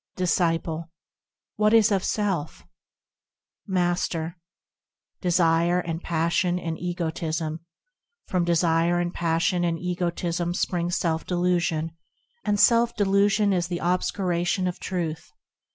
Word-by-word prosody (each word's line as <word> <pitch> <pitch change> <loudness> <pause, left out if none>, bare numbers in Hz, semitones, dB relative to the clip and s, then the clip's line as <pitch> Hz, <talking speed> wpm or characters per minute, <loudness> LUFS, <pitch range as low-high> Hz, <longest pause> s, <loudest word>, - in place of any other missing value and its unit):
Disciple. 165 -2 0 0.7
What 210 +1 +4
is 220 -1 +5
of 195 -2 +1
self? 195 -8 -2 1.0
Master. 175 -3 -1 0.9
Desire 170 -1 +3
and 165 -1 -4
passion 170 +2 0
and 165 -2 -3
egotism. 165 -2 -3 0.7
From 180 -2 0
desire 170 0 +2
and 175 0 -2
passion 170 +1 +1
and 170 -1 0
egotism 175 0 -2
springs 175 -1 -1
self 160 -2 -1
delusion; 175 -3 0 0.5
And 205 0 0
self 235 +1 +4
delusion 200 0 +3
is 175 -1 0
the 175 -1 -3
obscuration 180 0 0
of 180 - -4
Truth. 170 -4 -4
175 Hz, 105 wpm, -25 LUFS, 165-185 Hz, 1.0 s, is